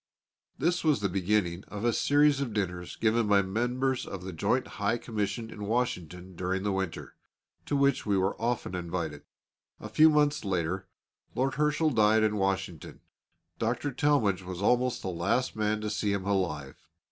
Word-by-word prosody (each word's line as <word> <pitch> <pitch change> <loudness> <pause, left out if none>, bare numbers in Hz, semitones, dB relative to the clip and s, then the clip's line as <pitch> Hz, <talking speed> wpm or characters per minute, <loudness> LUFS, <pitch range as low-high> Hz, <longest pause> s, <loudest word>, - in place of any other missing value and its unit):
This 175 +5 +1
was 150 -7 +3
the 100 -1 0
beginning 95 -1 0
of 105 +2 -5
a 120 - +3
series 145 +1 +3
of 125 -6 -3
dinners 90 -3 -3
given 115 0 +2
by 100 -1 +4
members 125 +6 -1
of 95 -2 -6
the 95 -1 -6
Joint 125 +10 +1 0.2
High 105 +3 +2
Commission 110 -1 -3
in 105 -1 -6
Washington 90 -6 -2
during 95 +2 -2
the 100 - 0
winter, 95 -3 -3 0.5
to 145 - 0
which 140 0 +2
we 100 -2 +1
were 95 +1 +1
often 120 -4 -1
invited. 85 -2 -3 0.6
A - - -8
few 155 +1 +6
months 150 -1 +2
later 95 -1 -2 0.5
Lord 130 +2 +1
Herschel 150 +1 +1
died 110 -2 +4
in 105 -1 +1
Washington. 95 -4 -2 0.6
Dr. 120 +5 -1
Talmage 125 -8 +2
was 90 -1 -7
almost 125 +4 +1
the 95 - -2
last 90 +9 0
man 105 0 0
to 105 - -2
see 105 -1 0
him 95 -2 -2
alive. 85 -9 -1
105 Hz, 170 wpm, -29 LUFS, 95-125 Hz, 0.6 s, few